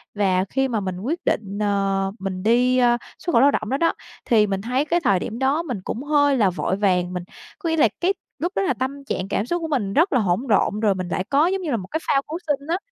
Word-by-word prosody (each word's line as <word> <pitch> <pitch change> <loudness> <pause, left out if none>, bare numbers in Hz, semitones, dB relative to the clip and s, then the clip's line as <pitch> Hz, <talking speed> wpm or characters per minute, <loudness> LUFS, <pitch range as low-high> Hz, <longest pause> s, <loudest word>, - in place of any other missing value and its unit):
Và 190 -2 +2
khi 270 0 +1
mà 225 -4 -1
mình 185 -2 -4
quyết 295 - -2
định, 200 -1 -1
ờ, 195 -1 0
mình 190 -1 -4
đi, 250 +3 +3
ơ, 240 -1 +4 0.2
xuất 345 - -3
khẩu 230 - +5
lao 280 +1 +6
động 215 -4 -2
đó, 270 - 0
đó, 335 - +2 0.3
thì 215 -3 +4
mình 195 -1 -2
thấy 255 +6 0
cái 345 +2 +1
thời 195 -2 +3
điểm 225 +6 -5
đó 280 +5 +1
mình 250 - -4
cũng 250 - -4
hơi 285 -2 +3
là 205 -5 +4
vội 185 +1 -1
vàng. 185 -3 +1
Mình 180 -1 -4 0.4
có 340 - -2
nghĩa 325 - 0
là 260 - +6
cái 375 +3 +2 0.3
lúc 350 +3 -1
đó - - +1
là 380 - +1
tâm 275 +2 -4
trạng 185 -7 -3
cảm 205 - 0
xúc 345 +5 -2
của 325 - -2
mình 220 -10 -1
rất 335 +2 +3
là 255 - +4
hỗn 185 -2 +1
độn 210 -1 +2
rồi 205 -3 +2
mình 185 -1 -4
lại 185 - -2
có 290 +4 +4
giống 380 +1 -1
như 315 -5 -3
là 235 - +1
một 185 -2 -7
cái 315 - -1
phao 275 - +3
cứu 320 +3 -4
sinh 285 0 -1
á. 340 +2 +1
240 Hz, 280 wpm, -22 LUFS, 195-290 Hz, 0.4 s, lao